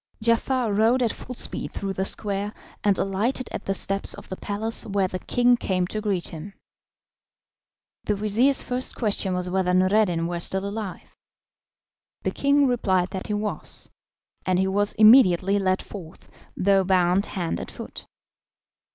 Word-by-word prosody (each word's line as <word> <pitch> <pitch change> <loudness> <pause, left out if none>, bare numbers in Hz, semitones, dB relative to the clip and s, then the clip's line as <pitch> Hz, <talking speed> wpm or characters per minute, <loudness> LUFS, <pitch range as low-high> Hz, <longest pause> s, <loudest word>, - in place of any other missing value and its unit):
Giafar 230 0 +1
rode 230 +5 +3
at 230 - 0
full 250 - -9
speed - - -1
through 195 -1 -4
the 190 0 -2
square, 205 +1 -3 0.3
and 200 -2 +2
alighted 215 +7 -1
at - - -6
the 195 - 0
steps 195 +1 +2
of - - -13
the 185 - -4
palace, 210 +4 0
where 195 -2 0
the 185 0 -5
king 245 +5 +2
came 185 -6 -1
to 215 +4 -4
greet 195 -5 -1
him. 170 +5 -9 1.5
The 210 - 0
vizir's 220 +7 +2
first 250 +1 0
question 200 -4 0
was 180 0 -1
whether 180 0 0
Noureddin 185 -2 +2
were 175 0 -3
still 190 +3 -3
alive. 200 -2 -6 1.1
The - - -1
king 280 0 +2
replied 190 -8 +1
that 190 - -5
he 210 - -1
was, 210 0 -3 0.5
and 185 -1 +1
he 190 - +2
was 200 +2 +2
immediately 205 -4 +5
led 185 -1 0
forth, 170 -6 -11 0.3
though 195 0 +3
bound 185 +1 +2
hand 175 -4 -3
and - - -7
foot. - - -9
200 Hz, 160 wpm, -24 LUFS, 185-220 Hz, 1.5 s, immediately